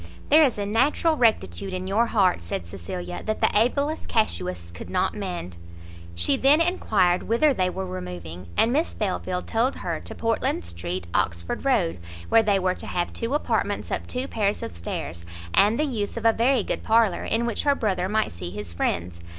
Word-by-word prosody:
"There 305 +2 +7
is 260 -7 +2
a 205 - -2
natural 270 +9 +2
rectitude 190 - +1
in 185 0 -4
your 215 +5 +2
heart," 190 - +2
said 85 0 -4
Cecilia, 90 0 -6
"that 215 0 -2
the - - +3
ablest 280 +8 +1
casuists 90 - -1
could 85 - -9
not 185 -1 +1
mend." 175 - -5 0.6
She 85 +10 +1
then 280 +4 +5
enquired 210 - +2
whither 270 +6 +3
they 185 -6 +1
were 95 - -4
removing, 90 -1 -7
and 235 - +4
Miss 310 +4 0
Belfield 185 -3 -2
told 235 +4 +1
her - - -3
to - - -6
Portland 225 - 0
Street, 85 +1 -5
Oxford 85 0 -1
Road, 205 - +2 0.3
where 225 - +6
they 205 -2 +2
were 185 -1 +1
to - - -6
have 175 -1 -2
two 235 +5 -2
apartments 295 - -1
up - - -2
two 255 +2 -3
pair 210 -6 +1
of 145 - -5
stairs, 85 0 -5 0.3
and 210 +3 +4
the 305 - +2
use 225 -6 -3
of 230 - -5
a 225 - +6
very 240 0 +2
good - - -3
parlour, 220 -4 +3
in 230 +1 0
which 235 - -1
her 285 -1 +3
brother 190 -6 -1
might 215 +1 +1
see 85 +1 -6
his 100 -2 -7
friends. 85 0 -2
195 Hz, 190 wpm, -25 LUFS, -, 0.6 s, There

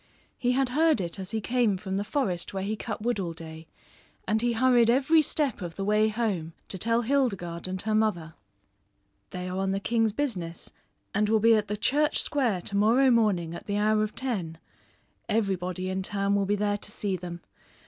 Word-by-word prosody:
He 245 0 +1
had 265 0 +1
heard 310 0 +3
it 175 +1 -4
as 190 -1 -4
he 220 +1 -1
came 230 -2 +1
from 190 0 -4
the 200 - -1
forest 200 -7 -2
where 190 - -2
he 210 +2 -2
cut 215 -1 -5
wood 240 -2 0
all 175 -3 -3
day 160 0 -10 0.6
and 220 0 +1
he 240 0 +1
hurried 240 -1 +4
every 280 +6 +4
step 285 -6 0
of 170 -2 -6
the 195 - -3
way 210 +1 +3
home 205 -8 -2 0.2
to 190 - -5
tell 230 +4 +2
Hildegarde 195 -11 0
and 185 0 -3
her 215 +1 -1
mother. 205 -7 0 1.0
"They 180 0 -5
are 185 +1 -3
on 195 0 0
the 195 - -1
king's 225 +1 +1
business 195 -11 -4 0.4
and 210 +1 +1
will 220 0 +4
be 230 +2 +5
at 210 -1 +2
the 210 +1 -3
Church 295 +7 +2
Square 245 - 0
to 200 - -5
morrow 235 +6 +4
morning 200 -8 +2
at 170 - -9
the 205 0 -1
hour 215 +1 +2
of 215 0 -2
ten. 190 -11 -2 0.7
Everybody 185 -4 -1
in 190 0 -2
town 200 +1 -1
will 200 -1 +1
be 205 - +2
there 205 0 0
to 205 - -7
see 205 -2 -2
them. 175 -1 -7
210 Hz, 205 wpm, -27 LUFS, 185-235 Hz, 1.0 s, be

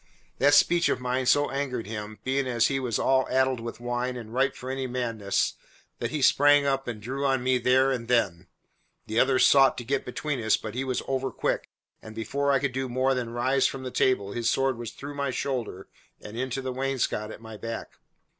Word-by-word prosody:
That 145 +2 +5
speech 170 0 +4
of - - 0
mine 125 0 -1
so 145 +2 +3
angered 135 -4 -2
him, 105 0 -6
being 135 0 0
as 120 -2 +2
he 135 -1 0
was 125 -4 -1
all 130 0 +2
addled 130 -1 +2
with 115 +1 -7
wine 120 +1 -2
and 115 -2 -9
ripe 135 +2 +1
for 130 +1 -6
any 135 0 -3
madness, 115 -5 -1 0.5
that - - -2
he 150 -3 -2
sprang 145 +2 +5
up 135 -1 0
and 115 -3 -4
drew 130 +6 -4
on 135 -2 +1
me 130 0 +2
there 130 +2 +3
and 120 -3 -3
then. 100 -9 +1 0.6
The 110 +2 0
others 130 -1 +4
sought 135 -1 +5
to 120 - -4
get 135 +3 -1
between 135 0 -3
us, 110 - +3
but 110 - -7
he 130 +2 -2
was 130 -2 -2
over 135 0 -1
quick, - - -2 0.3
and 110 0 -11
before 140 +6 -1
I 135 - +4
could 135 -1 -2
do 130 0 -2
more 130 +2 +1
than 125 -3 -2
rise 125 +3 +2
from 135 -1 -6
the 130 - -5
table 100 -8 +1
his 115 +1 0
sword 135 -2 +1
was 120 -2 -5
through 145 +1 -8
my 140 -1 -2
shoulder 125 -8 -3 0.3
and 105 - -10
into 130 +2 -3
the 130 -1 -3
wainscot 130 -5 -1
at - - -9
my 110 -1 -10
back. 115 +2 -7
130 Hz, 220 wpm, -27 LUFS, 115-135 Hz, 0.6 s, That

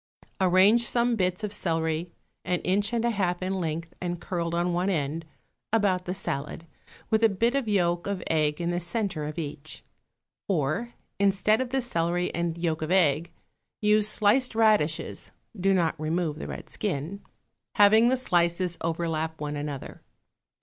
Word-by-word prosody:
Arrange 190 +5 +5
some 235 0 +3
bits 185 0 -1
of 210 -1 -2
celery, 165 -3 -1 0.3
an 180 -1 0
inch 205 +4 +1
and 235 -1 0
a 235 - +2
half 185 -4 -1
in 185 +1 -1
length 165 -2 -3
and 175 -1 -3
curled 170 -1 -3
on 175 +1 0
one 180 +3 0
end, 160 -2 -2 0.5
about 195 -5 +2
the 180 - -2
salad, 150 -2 -4 0.5
with 220 0 +3
a 225 - +7
bit 230 +5 +1
of 275 -4 -1
yolk 175 -4 +1
of 200 -3 -3
egg 150 -2 +1
in 170 0 -1
the 175 - -1
centre 175 -3 -1
of 150 +2 -6
each. 155 -1 -5 0.6
Or, 185 - -1 0.2
instead 200 +3 +3
of 260 - -3
the 265 +1 0
celery 175 -6 -1
and 170 -1 -2
yolk 165 -2 -1
of 155 - -3
egg, 170 -3 +2 0.5
use 210 0 +4
sliced 225 +4 +2
radishes 210 -9 +1 0.3
(do 195 -1 +1
not 165 -4 +1
remove 160 -1 -1
the - - -6
red - - -8
skin), 190 0 -3 0.5
having 215 +2 +6
the 260 +1 +3
slices 175 -5 +1
overlap 160 -1 -2
one 150 0 -3
another. 145 -2 -6
180 Hz, 165 wpm, -27 LUFS, 165-205 Hz, 0.6 s, a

